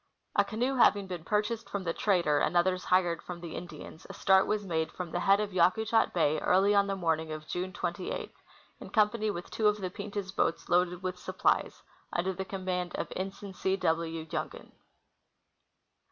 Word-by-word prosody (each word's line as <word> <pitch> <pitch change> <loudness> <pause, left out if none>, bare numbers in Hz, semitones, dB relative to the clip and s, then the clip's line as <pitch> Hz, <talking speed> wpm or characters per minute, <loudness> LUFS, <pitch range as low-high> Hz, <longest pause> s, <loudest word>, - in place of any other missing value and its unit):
A 205 - +5
canoe 230 +6 -1
having 205 -4 +5
been 180 -4 -6
purchased 210 +4 -1
from 200 -1 -3
the 165 -2 -1
trader 170 -8 +2
and 175 - +1
others 185 +1 +2
hired 175 -2 +2
from 180 -1 -7
the 170 -2 -7
Indians, 160 -2 -9
a - - -7
start 190 -1 +4
was 210 -1 -1
made 160 -3 -1
from 180 -2 -6
the 175 - -1
head 195 +2 +4
of 210 -2 -2
Yakutat 220 +6 +3
bay 155 -3 +2
early 195 +3 +3
on 200 0 +4
the 195 - -1
morning 160 -3 -1
of 155 0 -6
June 185 +1 -3
28, - - -4 0.5
in - - -9
company 215 0 +2
with 175 -4 -5
two 220 - +2
of 210 0 +3
the 185 -3 -4
Pirdah 200 -1 -5
boats 165 - 0
loaded 180 0 +2
with 185 -1 -3
supplies, - - 0 0.3
under 185 +2 0
the 190 +1 -4
com 190 -1 -6
mand 180 -1 -2
of - - -4
Ensign 195 +1 -5
C. 190 +1 0
W. 165 -2 -1
Jungen. 160 - -5
185 Hz, 190 wpm, -30 LUFS, 175-200 Hz, 0.5 s, A